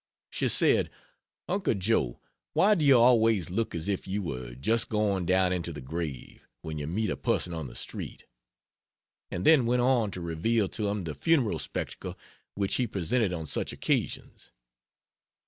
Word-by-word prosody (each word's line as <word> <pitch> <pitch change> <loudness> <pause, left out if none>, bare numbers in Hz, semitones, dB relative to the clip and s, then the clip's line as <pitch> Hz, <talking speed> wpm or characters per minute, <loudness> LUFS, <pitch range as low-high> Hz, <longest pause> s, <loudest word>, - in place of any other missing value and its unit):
She - - 0
said: - - +3 0.6
"Uncle 195 - 0
Joe, 95 - 0 0.3
why 210 +2 +5
do 170 -7 +1
you 140 -3 +7
always 115 -7 +4
look 110 +2 -1
as 85 +1 -3
if 100 -2 -2
you 100 +2 -2
were 65 -6 -5
just 115 - 0
going 100 -5 0
down 95 0 +3
into 85 -1 -2
the 75 - -7
grave, 75 -1 -6 0.2
when 80 -1 -5
you 75 - -4
meet 105 +7 -1
a - - -1
person 90 - -1
on 80 -4 -4
the - - -12
street?" - - -7 1.0
and 90 +2 -4
then 140 -7 +6
went 125 0 +2
on 125 -4 +3
to 95 - -6
reveal 90 +6 0
to 105 -2 -2
him 100 -1 -2
the 80 -2 -4
funereal 130 - +2
spectacle - - -5 0.4
which 100 -1 -1
he 125 - +1
presented 105 +2 0
on 80 -3 -4
such - - -2
occasions. - - -2
100 Hz, 170 wpm, -28 LUFS, 85-115 Hz, 1.0 s, you